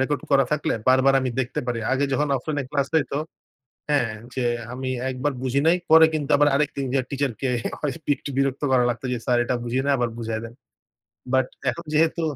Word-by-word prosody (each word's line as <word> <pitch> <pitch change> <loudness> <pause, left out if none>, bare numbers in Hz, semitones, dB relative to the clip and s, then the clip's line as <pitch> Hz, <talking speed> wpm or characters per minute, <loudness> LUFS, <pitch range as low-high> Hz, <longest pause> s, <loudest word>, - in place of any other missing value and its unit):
Record 135 0 0
করা 135 -1 +5
থাকলে 150 -1 0
বারবার 130 +1 +5
আমি 130 -1 -1
দেখতে 125 -1 -2
পারি। 120 -2 -1
আগে 135 +2 +2
যখন 145 +2 +1
অফলাইনে 145 +2 -3
ক্লাস 140 -2 0
হইতো 150 -3 +1 0.7
হ্যাঁ 135 -6 +2 0.2
যে 130 - -1 0.3
আমি 130 +1 -4 0.2
একবার 130 +3 -1
বুঝি 130 +1 +1
নাই 170 +2 +5
পরে 160 0 +9
কিন্তু 150 -2 -2
আবার 145 +1 +4
আরেকদিন 140 -1 0
যায়া 135 -2 +1
টিচারকে 135 -3 -2 0.3
ক - - -4 0.4
একটু - - -8
বিরক্ত 135 -1 0
করা 130 -1 +4
লাগতো 120 +1 -3
যে - - -1
"স্যার 125 - +2
এটা 125 - -1
বুঝি 120 +1 -2
নাই 140 - +3
আবার 120 -1 0
বুঝায় 110 -1 -3
দেন।" 115 +1 -8 0.8
বাট 130 -1 +3 0.2
এখন 170 +8 -8
যেহেতু 160 +2 +2
135 Hz, 195 wpm, -24 LUFS, 125-145 Hz, 0.8 s, পরে